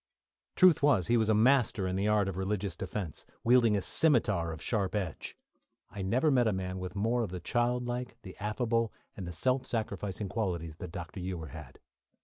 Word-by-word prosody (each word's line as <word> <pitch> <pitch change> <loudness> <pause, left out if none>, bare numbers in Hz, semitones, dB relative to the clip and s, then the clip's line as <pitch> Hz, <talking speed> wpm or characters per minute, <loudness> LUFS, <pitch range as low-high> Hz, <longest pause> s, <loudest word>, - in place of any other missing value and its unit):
Truth 180 -4 +6
was, 140 - +4
he 120 - +4
was 110 -2 +2
a 110 - +4
master 115 -3 +3
in 95 - -2
the 100 +2 0
art 105 -2 +3
of 95 - -3
religious 95 -1 -2
defence, 90 -4 -5 0.2
wielding 115 -3 +5
a 100 - -2
scimitar 105 - +2
of 80 - -7
sharp 100 0 -1
edge. 95 -7 -4 0.5
I 100 - -6
never 125 +11 +2
met 125 -3 +3
a - - +3
man 95 -1 -3
with 90 +1 -6
more 115 +4 +1
of 115 - -2
the 90 0 -5
childlike, 120 +4 -1
the 95 - -10
affable, 115 +1 0 0.2
and 95 -3 -6
the - - -4
self 130 +10 0
sacrificing 105 -3 -3
qualities 90 -5 -3
than 90 - -7
Dr. 90 +2 -7
Ewer 90 -4 -5
had. - - -10
105 Hz, 190 wpm, -31 LUFS, 90-120 Hz, 0.5 s, Truth